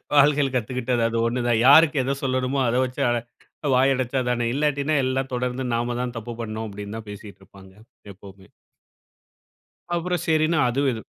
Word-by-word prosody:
வாழ்கையில 145 -1 +4
கத்துக்கிட்டது 125 +1 -1
அது 115 - -2
ஒண்ணு 120 +2 -2
தான். 115 -2 +2
யாருக்கு 145 0 +6
எதை 135 +2 -1
சொல்லணுமோ, 130 +1 -1
அத 115 - 0
வெச்சு 125 0 -4
அத 120 - +1 0.6
வாய் 135 +2 +4
அடைச்சா 130 +1 -1
தானே! 120 -1 0
இல்லாட்டினா 145 +1 0
எல்லாம் 130 0 -2
தொடர்ந்து 125 +1 -2
நாம 120 +1 -1
தான் 125 -1 -4
தப்பு 120 +1 -6
பண்ணோம். 110 0 -5
அப்டின்னு 100 +2 -7
தான் 110 -1 -10
பேசிட்டு 105 0 -10
இருப்பாங்க 95 0 -17 0.4
எப்பவுமே. 95 -1 -15 1.5
அப்புறம் 175 0 -2
சரின்னு 155 0 +2
அதுவும் 135 +3 +1
இது 110 - -8
125 Hz, 160 wpm, -23 LUFS, 115-140 Hz, 1.5 s, யாருக்கு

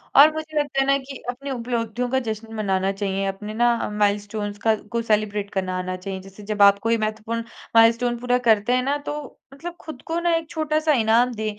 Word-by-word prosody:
और 300 +3 +8
मुझे 310 -1 -5
लगता 285 -2 -1
है - - +2
ना 275 0 +4
कि 270 -1 -8
अपनी 275 +3 -5
उपलब्धियों 240 -1 -2
का 265 +1 +2
जश्न 220 +1 -5
मनाना 195 -2 0
चाहिए। 195 0 -2
अपने 210 +2 -5
ना 235 0 +2
माइलस्टोन्स 205 0 -1
का 220 -1 +5 0.2
को 235 0 0
सेलिब्रेट 210 -2 0
करना 185 -1 -1
आना 185 0 -3
चाहिए। 190 0 -5
जैसे 195 +2 -13
जब 205 0 -2
आप 200 0 +7
कोई 230 +2 +1
महत्वपूर्ण 220 +2 -3 0.3
माइलस्टोन 230 +1 +5
पूरा 245 0 +1
करते 220 +2 +4
हैं 250 0 +2
ना, 285 +2 0
तो 295 -1 -7
मतलब 345 +5 -7
खुद 290 -5 -9
को 330 +1 -1
ना 340 -1 +1
एक 325 -2 -3
छोटा-सा 310 -1 +1
इनाम 235 +1 +3
दें। 215 0 -4
230 Hz, 205 wpm, -23 LUFS, 205-270 Hz, 0.3 s, और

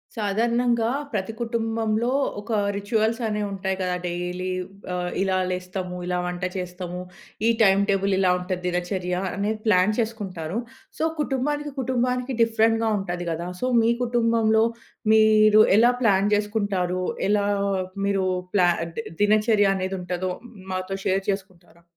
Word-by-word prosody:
సాధారణంగా 230 +2 +1 0.2
ప్రతి 205 +1 -2
కుటుంబంలో 225 0 -1 0.3
ఒక 220 +3 -8 0.2
రిచ్యువల్స్ 220 +3 0
అనేవి 210 -1 -1
ఉంటాయి 190 0 -2
కదా! 180 -1 0
డైలీ, 180 +1 -3 0.4
ఆహ్, 180 0 -2
ఇలా 190 -1 +1
లేస్తాము 180 0 -4
ఇలా 180 0 -1
వంట 180 0 -4
చేస్తాము. 180 0 -5 0.5
ఈ - - +5
టైమ్ 195 0 +5
టేబుల్ 195 0 +2
ఇలా 185 -2 +4
ఉంటది, 180 0 -4
దినచర్య 180 0 -2 0.2
అనేది 210 +2 -1
ప్లాన్ 200 +1 +4
చేసుకుంటారు. 200 -5 -3 0.4
సో, - - 0 0.2
కుటుంబానికి, 295 +1 -1
కుటుంబానికి 250 0 -1
డిఫరెంట్‌గా 225 0 +2
ఉంటది 175 -2 -4
కదా! 170 +2 -3
సో, - - 0 0.2
మీ 225 +1 +3
కుటుంబంలో 230 -2 +2 0.5
మీరు 215 -1 +6 0.2
ఎలా 240 +2 +6
ప్లాన్ 200 -1 +3
చేసుకుంటారు? 200 -4 -1 0.3
ఎలా 205 -1 +2 0.6
మీరు 195 -1 +1 0.3
ప్లా 180 -3 +5 0.3
ది 230 - -3 0.2
దినచర్య 210 0 +4
అనేది 190 0 -2
ఉంటదో 180 +1 -3 0.4
మాతో 185 +1 -3
షేర్ 195 +1 +1
చేసుకుంటారా? 185 -4 -6
200 Hz, 130 wpm, -24 LUFS, 185-225 Hz, 0.6 s, మీరు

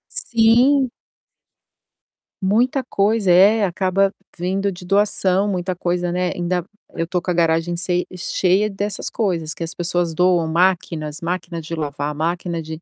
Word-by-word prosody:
Sim. 245 +4 +3 1.5
Muita 240 +8 +1
coisa. 205 -4 +1
É, 205 +4 +5
acaba 190 +2 +1 0.2
vindo 195 +3 -1
de 180 0 -10
doação. 195 0 +2
Muita 185 -2 -2
coisa, 175 0 -1
né, 180 0 -1
ainda 175 0 -1 0.3
eu 165 - -2
estou 175 +1 -2
com 185 - -6
a - - +1
garagem 165 0 +1
sei 180 +1 -1
cheia 190 +3 +1
dessas 205 0 -3
coisas 170 -7 -1
que 170 - -6
as 165 - -4
pessoas 175 -1 -1
doam, 180 -1 +2
máquinas, 165 -3 0
máquina 170 0 -3
de 165 +1 -6
lavar, 145 -1 -3
máquina 170 +1 -2
de 160 +1 -8
180 Hz, 145 wpm, -20 LUFS, 170-195 Hz, 1.5 s, É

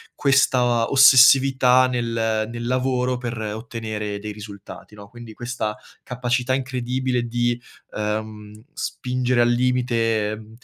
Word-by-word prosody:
questa 125 -4 +2
ossessività 130 -1 +6
nel 115 -3 -1
nel 120 0 -6
lavoro 125 0 -1
per 120 -1 -5
ottenere 110 -1 -5
dei 105 +1 -6
risultati, 105 0 -11
no. 100 -1 -12
Quindi 120 -2 -12
questa 120 -3 -4 0.3
capacità 125 0 -2
incredibile 130 -2 -3 0.3
di, 120 0 -1 0.3
uhm, 105 0 -5
spingere 125 -4 -1
al 120 - +3
limite, 115 -4 0
120 Hz, 105 wpm, -22 LUFS, 110-125 Hz, 0.3 s, ossessività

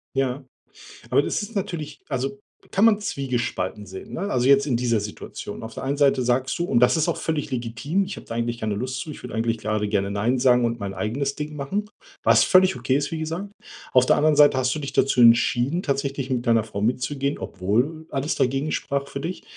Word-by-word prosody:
Ja. 135 0 -1 0.7
Aber - - +4
das - - -2
ist 210 +2 -8
natürlich 155 -6 -4
also, 135 +1 -3 0.3
kann 200 +3 +4
man 215 -2 +5
zwiegespalten 120 - -3
sehen, 95 0 -10
ne? - - -4
Also, 125 0 +1
jetzt 140 +1 +5
in 120 -4 +1
dieser 120 -3 +1
Situation. 105 +1 -7
Auf 110 0 -7
der - - -6
einen 140 +2 -1
Seite 140 -2 +3
sagst 130 +1 0
du 175 - +1
und 225 +5 +2
das 175 - +4
ist 160 - +1
auch 170 - 0
völlig 155 -3 -2
legitim: 130 +10 -1
„Ich 195 - -6
habe - - -10
da 115 - -5
eigentlich 115 0 -2
keine 110 -2 -2
Lust 125 +4 -3
zu, 155 - -7
ich - - -10
würde 125 - -7
eigentlich 115 0 0
grade 105 0 -1
gerne 100 -1 0
'Nein' 115 +6 0
sagen 125 -1 +4
und 115 0 -2
mein 100 -1 -4
eigenes 130 +9 -2
Ding 150 0 -5
machen“, 200 +10 -3 0.3
was - - +5
völlig 185 0 +5
okay 130 - 0
ist, 145 +1 -2
wie 160 - -3
gesagt. 165 +6 -4 0.4
Auf 130 -1 +6
der - - +4
anderen 155 +1 +3
Seite 145 -2 +6
hast 130 0 +1
du - - -3
dich 140 -2 -6
dazu 130 -2 +3
entschieden, 120 +7 +4
tatsächlich 140 -1 -2
mit 125 -1 -1
deiner 115 -1 +4
Frau 100 -2 -6
mitzugehen, 135 +5 -1
obwohl 120 - -1
alles 140 +2 -1
dagegen 135 +4 0
sprach 140 -1 -2
für 140 - -6
dich. 170 +6 -5
135 Hz, 225 wpm, -24 LUFS, 115-150 Hz, 0.7 s, Auf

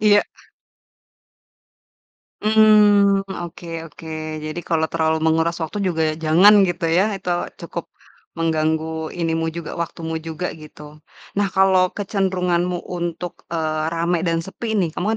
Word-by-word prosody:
Iya. 205 -1 +5 2.2
Mmm, 210 -2 +5 0.2
oke 170 0 -9 0.2
oke. 160 - -13 0.4
Jadi, 155 +3 -4
kalau 160 -1 +2
terlalu 160 -1 +1
menguras 165 +1 +1
waktu 160 +6 -4
juga, 170 -4 0 0.2
jangan, 180 +7 +7
gitu 170 -1 -2
ya. 175 +4 +3
Itu 180 - -4 0.3
cukup 170 0 -6 0.5
mengganggu 160 0 -1
ini 165 -1 0
mu 165 0 -1
juga, 170 0 -6
waktumu 160 0 -5
juga 165 +2 -4
gitu. 150 -1 -13 0.3
Nah, 200 -1 +1
kalau 190 -1 +4
kecenderunganmu 180 -3 -1
untuk, 175 -1 -4 0.2
eee, 155 -2 -1
rame 170 +1 0
dan 165 -2 +1
sepi 225 +4 -6
nih, 175 -4 +2
kamu 180 - -2
170 Hz, 125 wpm, -21 LUFS, 160-190 Hz, 2.2 s, jangan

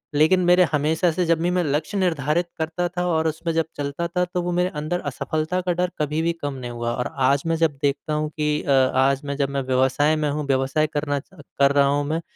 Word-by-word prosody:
लेकिन 160 +5 +4
मेरे 180 +1 +6
हमेशा 160 +4 +1
से 180 +3 -1
जब 165 -1 +2
भी 175 - +1
मैं 180 - +2
लक्ष्य 150 +7 -1
निर्धारित 170 -1 0
करता 165 +2 -1
था 180 - 0
और 160 -1 +1
उसमें 165 +2 -2
जब 165 -1 +1
चलता 145 +4 -3
था 180 +1 0
तो 180 - 0
वो 175 0 -2
मेरे 180 +1 +1
अंदर 175 +4 -2
असफलता 155 +6 -2
का 180 0 -1
डर 180 +1 -1
कभी 150 +1 0
भी 170 +1 +1
कम 145 -1 -3
नहीं 125 -2 -6
हुआ। 120 0 -3
और 125 - -3 0.2
आज 140 0 +2
मैं 165 - +1
जब 155 -4 +1
देखता 145 +2 0
हूँ 150 0 -1
कि 150 0 0
अ, 140 - -1
आज 135 +1 +3
मैं 140 0 -3
जब 140 -1 0
मैं 140 0 -2
व्यवसाय 130 +4 +2
में 150 -1 0
हूँ 150 0 -2
व्यवसाय 135 +3 +1
करना 145 -1 -1
च 190 +6 -16 0.2
कर 140 0 +5
रहा 140 -1 +4
हूँ 145 +1 +1
मैं 160 +2 -1
155 Hz, 245 wpm, -23 LUFS, 140-170 Hz, 0.2 s, मेरे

